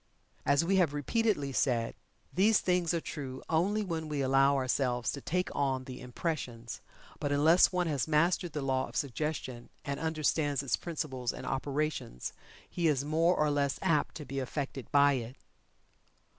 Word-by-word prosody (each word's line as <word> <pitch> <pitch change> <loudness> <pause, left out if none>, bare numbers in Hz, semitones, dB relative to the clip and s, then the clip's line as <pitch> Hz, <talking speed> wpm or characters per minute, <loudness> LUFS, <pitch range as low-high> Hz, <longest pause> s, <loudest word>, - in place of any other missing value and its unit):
As 140 +4 +4
we 195 +2 +3
have 165 -6 +3
repeatedly 145 - 0
said, 120 -4 +1 0.4
these 205 +4 +4
things 180 -2 +1
are 170 - +1
true 135 -5 -6
only 195 +7 +1
when 165 -4 -3
we 145 -2 -1
allow 135 +1 +4
ourselves 130 -2 0
to 140 - -6
"take 180 +6 -2
on" 135 -2 0
the 130 -1 -8
impressions, 125 -3 -4 0.4
but 145 - -1
unless 155 +5 +5
one 180 -1 +1
has 145 -5 -1
mastered 165 +2 +2
the 150 - -3
law 130 -1 0
of - - -14
suggestion, 135 -3 -3 0.2
and 140 0 -3
understands 155 -3 0
its 135 - +1
principles 130 -7 -3
and - - -8
operations 140 - -2 0.3
he 170 -2 0
is 140 -3 +1
more 165 +4 +3
or 150 -1 +2
less 140 -2 +1
apt 150 -3 +1
to 150 - -7
be 135 +1 -4
affected 135 0 -4
by 145 0 +6
it. 125 -1 -4
145 Hz, 165 wpm, -31 LUFS, 135-165 Hz, 0.4 s, by